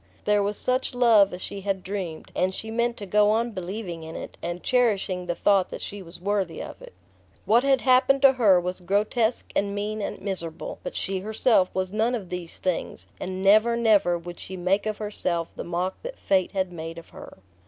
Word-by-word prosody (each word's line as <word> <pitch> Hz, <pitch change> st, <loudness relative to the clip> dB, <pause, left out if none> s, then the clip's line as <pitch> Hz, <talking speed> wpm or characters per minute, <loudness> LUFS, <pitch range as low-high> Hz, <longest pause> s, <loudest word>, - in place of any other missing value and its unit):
There 210 Hz, 0 st, +3 dB
was 205 Hz, +1 st, -1 dB
such 255 Hz, 0 st, -1 dB
love 225 Hz, -5 st, +5 dB
as 180 Hz, -, -6 dB
she 200 Hz, -, -5 dB
had 190 Hz, -1 st, -2 dB
dreamed, 185 Hz, -5 st, -5 dB
and 185 Hz, +1 st, +1 dB
she 220 Hz, -, -4 dB
meant 235 Hz, +1 st, 0 dB
to 205 Hz, -, -6 dB
go 210 Hz, +2 st, +4 dB
on 230 Hz, +2 st, +1 dB
believing 185 Hz, -2 st, -5 dB
in 160 Hz, +1 st, -8 dB
it, -, -, -7 dB
and 175 Hz, +1 st, -4 dB
cherishing 200 Hz, -7 st, +1 dB
the 175 Hz, -, -1 dB
thought 195 Hz, +1 st, +3 dB
that -, -, -6 dB
she 205 Hz, 0 st, -6 dB
was 170 Hz, -1 st, -11 dB
worthy 195 Hz, -2 st, -1 dB
of -, -, -8 dB
it. -, -, -12 dB, 0.5 s
What 235 Hz, +3 st, +4 dB
had 270 Hz, -2 st, +3 dB
happened 265 Hz, +1 st, +4 dB
to 270 Hz, -1 st, +8 dB
her 210 Hz, -8 st, +5 dB
was 180 Hz, +1 st, -3 dB
grotesque 210 Hz, +5 st, 0 dB
and 200 Hz, 0 st, 0 dB
mean 210 Hz, +1 st, -3 dB
and -, -, -4 dB
miserable; 175 Hz, -5 st, -5 dB
but -, -, -6 dB
she 190 Hz, 0 st, -2 dB
herself 215 Hz, -1 st, +2 dB
was 185 Hz, 0 st, -2 dB
none 225 Hz, +3 st, +1 dB
of 195 Hz, -7 st, -6 dB
these 180 Hz, -2 st, -5 dB
things, 165 Hz, -, -2 dB
and 185 Hz, +1 st, -4 dB
never, 215 Hz, +4 st, +5 dB
never 210 Hz, -7 st, +3 dB
would 175 Hz, +1 st, -9 dB
she 190 Hz, -, -7 dB
make 190 Hz, +4 st, +1 dB
of 215 Hz, -1 st, -2 dB
herself 180 Hz, -5 st, -2 dB
the -, -, -5 dB
mock 180 Hz, +2 st, -3 dB
that -, -, -7 dB
fate 190 Hz, 0 st, +1 dB
had 190 Hz, -2 st, -1 dB
made 165 Hz, 0 st, -6 dB
of 170 Hz, -, -11 dB
her... -, -, -12 dB
200 Hz, 210 wpm, -25 LUFS, 180-220 Hz, 0.5 s, to